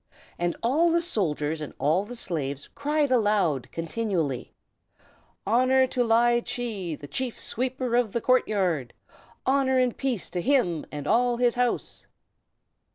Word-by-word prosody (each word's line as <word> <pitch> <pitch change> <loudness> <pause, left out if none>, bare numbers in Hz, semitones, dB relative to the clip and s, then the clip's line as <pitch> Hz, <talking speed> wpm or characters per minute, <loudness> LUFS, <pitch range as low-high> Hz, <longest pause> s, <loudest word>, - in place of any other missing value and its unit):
And 175 0 0
all 300 +9 +3
the 340 - +3
soldiers 160 - -1
and 150 - -7
all 165 +7 +1
the 245 +3 -8
slaves 145 - -3
cried 295 -1 0
aloud, 205 - +1
continually: 165 - -2 0.9
"Honor 255 +4 +4
to 250 -1 0
Ly 240 +1 +4
Chee, 235 - -4
the 145 - -11
Chief 245 - -3
Sweeper 255 0 -2
of 240 -4 +2
the 235 - -1
court 255 +2 +3
yard! 175 - -1 0.5
Honor 265 -1 +2
and 250 -2 +2
peace 255 -8 -2
to 180 - -2
him 180 - +1
and 145 -1 -6
all 240 +6 +2
his 240 -1 +3
house!" 245 -1 -2
230 Hz, 145 wpm, -26 LUFS, 170-255 Hz, 0.9 s, Honor